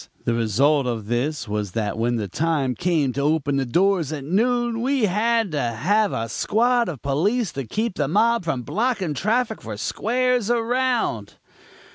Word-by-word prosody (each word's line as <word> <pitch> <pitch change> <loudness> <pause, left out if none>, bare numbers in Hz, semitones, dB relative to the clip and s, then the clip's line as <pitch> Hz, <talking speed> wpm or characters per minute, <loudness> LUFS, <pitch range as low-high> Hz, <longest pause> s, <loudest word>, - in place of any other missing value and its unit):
The 115 - +1
result 125 +5 +2
of 115 -4 -3
this 120 +3 -2
was 105 -2 -3
that 110 -2 -2
when 120 +2 0
the 105 -3 -2
time 145 - 0
came 160 -5 0
to 140 - -2
open 145 -1 +1
the 135 -2 -1
doors 175 +1 +2
at 150 -3 -5
noon 235 - 0
we 265 -2 +1
had 220 +1 +1
to 145 -2 -1
have 190 - +1
a 115 0 -2
squad 235 - +1
of 150 -8 -7
police 190 - 0
to 135 -3 -5
keep 220 - -2
the 145 - 0
mob 225 +6 +2
from 135 -7 -2
blocking 195 - -1
traffic 220 - 0
for 110 -2 -7
squares 245 - 0
around. 240 - 0
160 Hz, 170 wpm, -23 LUFS, -, -, result